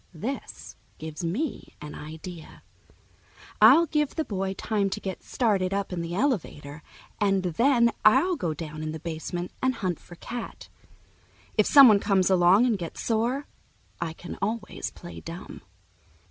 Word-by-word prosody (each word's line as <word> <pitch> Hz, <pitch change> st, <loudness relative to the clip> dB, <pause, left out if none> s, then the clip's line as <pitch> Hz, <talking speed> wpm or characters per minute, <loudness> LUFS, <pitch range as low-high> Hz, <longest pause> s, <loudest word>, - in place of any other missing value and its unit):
This 250 Hz, -, -6 dB, 0.2 s
gives 160 Hz, +1 st, -7 dB
me 220 Hz, -, -3 dB
an 150 Hz, 0 st, -8 dB
idea. 160 Hz, +2 st, -9 dB, 1.0 s
I'll 265 Hz, +11 st, +8 dB
give 300 Hz, -2 st, -1 dB
the 315 Hz, -, -1 dB
boy 195 Hz, -1 st, -3 dB
time 205 Hz, 0 st, 0 dB
to 190 Hz, -, -4 dB
get 190 Hz, -1 st, -5 dB
started 195 Hz, -6 st, 0 dB
up 200 Hz, -2 st, -2 dB
in 175 Hz, -, -2 dB
the 170 Hz, +1 st, -4 dB
elevator, 160 Hz, -, -2 dB, 0.4 s
and 195 Hz, -2 st, +2 dB
then 235 Hz, -, +3 dB
I'll 350 Hz, +12 st, +5 dB
go 165 Hz, -, -2 dB
down 155 Hz, 0 st, -7 dB
in 155 Hz, 0 st, -4 dB
the 160 Hz, -, -6 dB
basement 170 Hz, +2 st, -5 dB
and 260 Hz, 0 st, +1 dB
hunt 180 Hz, -5 st, -2 dB
for 175 Hz, -, -14 dB
Cat. 235 Hz, +6 st, -7 dB, 0.9 s
If -, -, +3 dB
someone 255 Hz, -8 st, +8 dB
comes 195 Hz, -2 st, +2 dB
along 185 Hz, +5 st, +5 dB
and 225 Hz, -5 st, +1 dB
gets 170 Hz, -2 st, -6 dB
sore, 240 Hz, +5 st, 0 dB, 0.6 s
I 165 Hz, -2 st, -2 dB
can 175 Hz, -, -9 dB
always 210 Hz, +2 st, -3 dB
play 175 Hz, -, -10 dB
dumb. 170 Hz, +2 st, -9 dB
195 Hz, 150 wpm, -26 LUFS, 170-235 Hz, 1.0 s, I'll